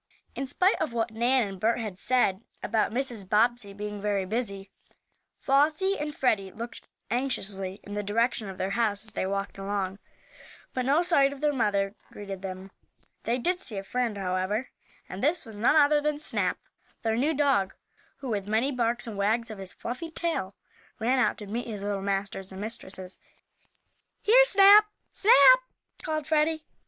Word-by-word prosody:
In 270 Hz, -, -4 dB
spite 365 Hz, +8 st, +2 dB
of 310 Hz, -6 st, -1 dB
what 230 Hz, -1 st, -1 dB
Nan 240 Hz, +1 st, +2 dB
and 195 Hz, -1 st, -8 dB
Bert 225 Hz, +4 st, +2 dB
had 210 Hz, -6 st, -5 dB
said 220 Hz, -6 st, +2 dB, 0.2 s
about 220 Hz, -2 st, +1 dB
Mrs. 235 Hz, -6 st, -3 dB
Bobbsey 225 Hz, 0 st, +2 dB
being 205 Hz, 0 st, -6 dB
very 200 Hz, -2 st, 0 dB
busy, 200 Hz, -2 st, -3 dB, 0.7 s
Flossie 305 Hz, +8 st, +2 dB
and 295 Hz, 0 st, -4 dB
Freddie 200 Hz, -7 st, +1 dB
looked 235 Hz, +3 st, -8 dB, 0.2 s
anxiously 200 Hz, -7 st, -2 dB
in 205 Hz, -, -9 dB
the 205 Hz, -, -2 dB
direction 220 Hz, +1 st, 0 dB
of 190 Hz, -, -8 dB
their 190 Hz, -, -2 dB
house 215 Hz, -2 st, 0 dB
as 220 Hz, -, -8 dB
they 190 Hz, -, -2 dB
walked 195 Hz, 0 st, -3 dB
along. 195 Hz, -1 st, -3 dB, 0.7 s
But 255 Hz, -1 st, -2 dB
no 295 Hz, +5 st, +4 dB
sight 280 Hz, -6 st, +4 dB
of 280 Hz, -, -11 dB
their 295 Hz, 0 st, +1 dB
mother 200 Hz, -5 st, 0 dB, 0.2 s
greeted 195 Hz, -2 st, -7 dB
them. 190 Hz, 0 st, -7 dB, 0.5 s
They 235 Hz, +2 st, +1 dB
did 355 Hz, +8 st, -1 dB
see 215 Hz, -, -4 dB
a 195 Hz, -, -4 dB
friend, 235 Hz, +1 st, -2 dB
however, 190 Hz, +5 st, -2 dB, 0.4 s
and 185 Hz, -, -7 dB
this 310 Hz, +3 st, +1 dB
was 220 Hz, -2 st, -10 dB
none 225 Hz, +8 st, +3 dB
other 295 Hz, -1 st, +5 dB
than 300 Hz, 0 st, 0 dB
Snap, 305 Hz, -, -1 dB, 0.5 s
their 225 Hz, -1 st, +1 dB
new 295 Hz, +7 st, +1 dB
dog, 270 Hz, -10 st, +1 dB, 0.5 s
who, 265 Hz, -, -5 dB
with 205 Hz, -3 st, -2 dB
many 225 Hz, +6 st, +1 dB
barks 240 Hz, -2 st, -1 dB
and 225 Hz, -3 st, -6 dB
wags 225 Hz, +3 st, 0 dB
of 210 Hz, -, -8 dB
his 190 Hz, -1 st, -3 dB
fluffy 255 Hz, +8 st, -5 dB
tail, 320 Hz, -, -3 dB, 0.4 s
ran 250 Hz, +4 st, +1 dB
out -, -, +2 dB
to 210 Hz, -, -8 dB
meet 230 Hz, +5 st, -4 dB
his 210 Hz, -3 st, -5 dB
little 200 Hz, -1 st, -2 dB
masters 195 Hz, -1 st, -3 dB
and 190 Hz, -, -8 dB
mistresses. 190 Hz, -4 st, -5 dB, 1.0 s
"Here, -, -, +7 dB
Snap! 410 Hz, -1 st, +8 dB, 0.2 s
Snap!" -, -, +7 dB, 0.4 s
called 310 Hz, -1 st, -3 dB
Freddie. 315 Hz, +1 st, +1 dB
225 Hz, 175 wpm, -27 LUFS, 200-275 Hz, 1.0 s, Snap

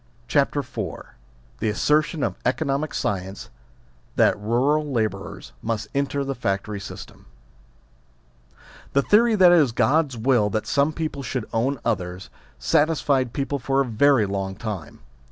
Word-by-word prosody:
CHAPTEE 140 Hz, +3 st, +2 dB
IV 130 Hz, -2 st, -17 dB, 0.8 s
THE -, -, 0 dB
ASSERTION 150 Hz, +7 st, +1 dB
OF -, -, 0 dB
ECONOMIC 140 Hz, +2 st, 0 dB
SCIENCE 95 Hz, -4 st, -3 dB, 0.6 s
THAT -, -, +4 dB
ALL -, -, -13 dB
EURAL 140 Hz, +7 st, +1 dB
LABOURERS 105 Hz, -, -3 dB
MUST 110 Hz, -1 st, -3 dB
ENTER 140 Hz, 0 st, 0 dB
THE 135 Hz, 0 st, -2 dB
FACTORY 100 Hz, -3 st, -2 dB
SYSTEM 100 Hz, -, -10 dB, 1.7 s
THE 140 Hz, -, +3 dB
theory 225 Hz, +2 st, +4 dB
that 185 Hz, -3 st, +7 dB
it 175 Hz, -, +7 dB
is 140 Hz, -6 st, +3 dB
God's 140 Hz, +2 st, +2 dB
will 115 Hz, -3 st, +2 dB
that 110 Hz, +1 st, -2 dB
some 140 Hz, +2 st, +2 dB
people 155 Hz, -3 st, -4 dB
should 125 Hz, -2 st, -3 dB
own 125 Hz, +4 st, 0 dB
others, 95 Hz, -4 st, -3 dB, 0.3 s
satisfied 140 Hz, -, +2 dB
people 140 Hz, +2 st, -2 dB
for 135 Hz, +2 st, 0 dB
a 140 Hz, -, +3 dB
very 125 Hz, 0 st, +3 dB
long 95 Hz, -1 st, -3 dB
time. 100 Hz, -8 st, -6 dB
130 Hz, 140 wpm, -23 LUFS, 105-145 Hz, 1.7 s, that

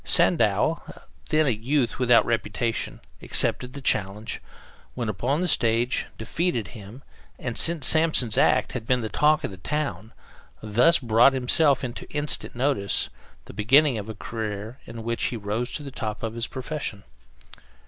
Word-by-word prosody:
Sandow, -, -, +2 dB, 0.5 s
then 155 Hz, 0 st, +2 dB
a 135 Hz, -, +2 dB
youth 125 Hz, +4 st, -1 dB
without 125 Hz, -2 st, +4 dB
reputation, 115 Hz, 0 st, -2 dB, 0.2 s
accepted 125 Hz, 0 st, +3 dB
the 140 Hz, -, -8 dB
challenge, 105 Hz, -2 st, -2 dB, 0.5 s
went 120 Hz, -3 st, -2 dB
upon 130 Hz, -, -1 dB
the 180 Hz, -, 0 dB
stage, 120 Hz, -4 st, +1 dB
defeated 120 Hz, -, -2 dB
him, 110 Hz, +4 st, -12 dB, 0.3 s
and, 120 Hz, -3 st, -5 dB
since 165 Hz, -4 st, +3 dB
Samson's 155 Hz, -8 st, +4 dB
act -, -, +2 dB
had 110 Hz, -, -6 dB
been 125 Hz, -1 st, +1 dB
the 110 Hz, -, -4 dB
talk 155 Hz, -, +2 dB
of 130 Hz, -, -3 dB
the 95 Hz, -, -10 dB
town, 110 Hz, -, -4 dB, 0.5 s
thus 120 Hz, +11 st, +3 dB
brought 120 Hz, +2 st, +4 dB
himself 135 Hz, +2 st, +2 dB
into 120 Hz, -2 st, -6 dB
instant 150 Hz, -3 st, +2 dB
notice, 125 Hz, -6 st, 0 dB, 0.4 s
the -, -, -12 dB
beginning 130 Hz, +3 st, +3 dB
of 105 Hz, +1 st, -8 dB
a 110 Hz, -, -6 dB
career 110 Hz, +2 st, -6 dB
in 115 Hz, -1 st, -8 dB
which 115 Hz, +1 st, -2 dB
he 120 Hz, -, -2 dB
rose 110 Hz, +4 st, -3 dB
to 150 Hz, -, -5 dB
the 140 Hz, -, -8 dB
top 110 Hz, -5 st, -5 dB
of 115 Hz, -1 st, -3 dB
his 115 Hz, 0 st, -3 dB
profession. 130 Hz, -6 st, -6 dB
120 Hz, 160 wpm, -24 LUFS, 110-140 Hz, 0.5 s, without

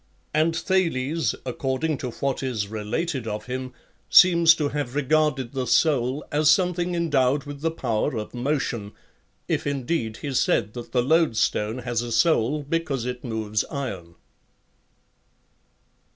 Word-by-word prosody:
And 160 Hz, +2 st, +2 dB
Thales, 165 Hz, -5 st, 0 dB
according 135 Hz, +3 st, -2 dB
to 125 Hz, -, -4 dB
what 135 Hz, +2 st, -2 dB
is 115 Hz, -7 st, -2 dB
related 115 Hz, +5 st, -3 dB
of 105 Hz, 0 st, -4 dB
him, 130 Hz, 0 st, -5 dB, 0.4 s
seems 170 Hz, -2 st, +7 dB
to 150 Hz, -3 st, -1 dB
have 140 Hz, -3 st, -4 dB
regarded 145 Hz, -3 st, +1 dB
the 130 Hz, -2 st, -3 dB
soul 130 Hz, +1 st, +2 dB
as 150 Hz, 0 st, +3 dB
something 180 Hz, -1 st, +2 dB
endowed 145 Hz, -5 st, +1 dB
with 145 Hz, 0 st, -8 dB
the 165 Hz, -, +1 dB
power 120 Hz, -6 st, -1 dB
of 105 Hz, -, -5 dB
motion, 120 Hz, -5 st, -2 dB, 0.5 s
if -, -, -1 dB
indeed 130 Hz, -5 st, -2 dB
he 140 Hz, -2 st, -3 dB
said 110 Hz, -4 st, +1 dB
that 120 Hz, -1 st, -8 dB
the 125 Hz, -1 st, +2 dB
loadstone 125 Hz, -6 st, +1 dB
has 120 Hz, -2 st, -1 dB
a 120 Hz, 0 st, -5 dB
soul 140 Hz, +3 st, +2 dB
because 145 Hz, -4 st, -2 dB
it 125 Hz, 0 st, -5 dB
moves 110 Hz, -3 st, -2 dB
iron. 95 Hz, -12 st, -6 dB
135 Hz, 135 wpm, -24 LUFS, 120-155 Hz, 0.5 s, seems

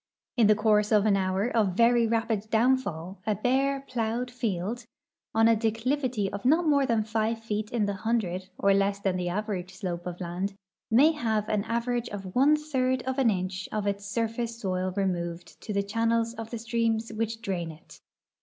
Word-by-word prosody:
In 235 Hz, -5 st, +5 dB
the 215 Hz, -, +6 dB
course 210 Hz, -1 st, +2 dB
of 210 Hz, -1 st, +4 dB
an 210 Hz, -2 st, +4 dB
hour 190 Hz, +2 st, 0 dB
of 215 Hz, -7 st, +1 dB
very 235 Hz, 0 st, +5 dB
rapid 225 Hz, -2 st, -1 dB
downfall 220 Hz, -7 st, +1 dB
a 215 Hz, -, +2 dB
hare, 270 Hz, +2 st, +2 dB
plowed 240 Hz, +1 st, -2 dB
field, 225 Hz, 0 st, -2 dB, 0.5 s
on 225 Hz, 0 st, +5 dB
a 230 Hz, -, +5 dB
declivity 225 Hz, +1 st, 0 dB
of 200 Hz, -, -5 dB
not 315 Hz, +7 st, +4 dB
more 280 Hz, -3 st, +3 dB
than 230 Hz, -3 st, +2 dB
five 220 Hz, +1 st, 0 dB
feet 215 Hz, -1 st, -2 dB
in 230 Hz, -3 st, 0 dB
the 200 Hz, -, -1 dB
hundred, 190 Hz, -3 st, -2 dB
or 200 Hz, 0 st, +3 dB
less 200 Hz, 0 st, +1 dB
than 190 Hz, -2 st, 0 dB
the 180 Hz, -1 st, -1 dB
average 185 Hz, -2 st, -4 dB
slo])e 175 Hz, -2 st, -3 dB
of 175 Hz, -1 st, -6 dB
land, 185 Hz, +3 st, -3 dB, 0.3 s
may 275 Hz, +8 st, +6 dB
have 220 Hz, -8 st, -1 dB
an 210 Hz, -2 st, +1 dB
average 235 Hz, +1 st, -1 dB
of 195 Hz, -2 st, -7 dB
one 280 Hz, +4 st, +5 dB
third 260 Hz, -4 st, 0 dB
of 260 Hz, +1 st, -2 dB
an 255 Hz, -4 st, +4 dB
inch 185 Hz, 0 st, -2 dB
of 210 Hz, -1 st, -2 dB
its 200 Hz, 0 st, -2 dB
sur 225 Hz, +2 st, 0 dB
face 230 Hz, +1 st, -4 dB
soil 185 Hz, -3 st, -1 dB
removed 175 Hz, -3 st, -3 dB
to 215 Hz, -, -6 dB
the 200 Hz, -1 st, +1 dB
channels 230 Hz, +2 st, 0 dB
of 225 Hz, -1 st, -7 dB
the 235 Hz, -, -4 dB
streams 225 Hz, 0 st, -1 dB
which 225 Hz, +1 st, -2 dB
drain 185 Hz, -7 st, -3 dB
it. 155 Hz, +1 st, -15 dB
220 Hz, 190 wpm, -27 LUFS, 195-235 Hz, 0.5 s, the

